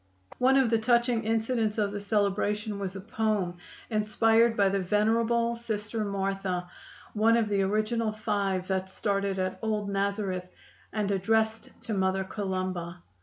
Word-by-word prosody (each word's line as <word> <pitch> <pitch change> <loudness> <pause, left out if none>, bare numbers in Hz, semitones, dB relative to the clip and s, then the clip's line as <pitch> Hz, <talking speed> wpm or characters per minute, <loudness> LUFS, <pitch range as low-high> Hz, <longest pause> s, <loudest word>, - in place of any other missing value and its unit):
One 265 +2 +5
of 260 -4 +3
the 225 - +3
touching 235 0 +2
incidents 225 -1 0
of 205 -2 +1
the 205 - -4
celebration 205 +1 0
was 195 -1 -4
a 195 - -6
poem 210 -4 -1 0.3
inspired 225 +2 +3
by 200 -1 +4
the 195 +1 0
venerable 230 +4 +2
Sister 220 -1 -3
Martha, 195 -2 -2 0.5
one 225 +2 +4
of 225 -2 +1
the 200 -1 +2
original 215 +3 0
five 200 -4 -1
that 190 0 -1
started 200 0 -1
at 185 0 -2
"Old 210 -2 -1
Nazareth," 195 -2 -1 0.4
and 210 -2 -1
addressed 220 +3 +1
to 225 - -3
Mother 190 -1 +1
Columba. 185 -3 -4
210 Hz, 145 wpm, -28 LUFS, 195-225 Hz, 0.5 s, One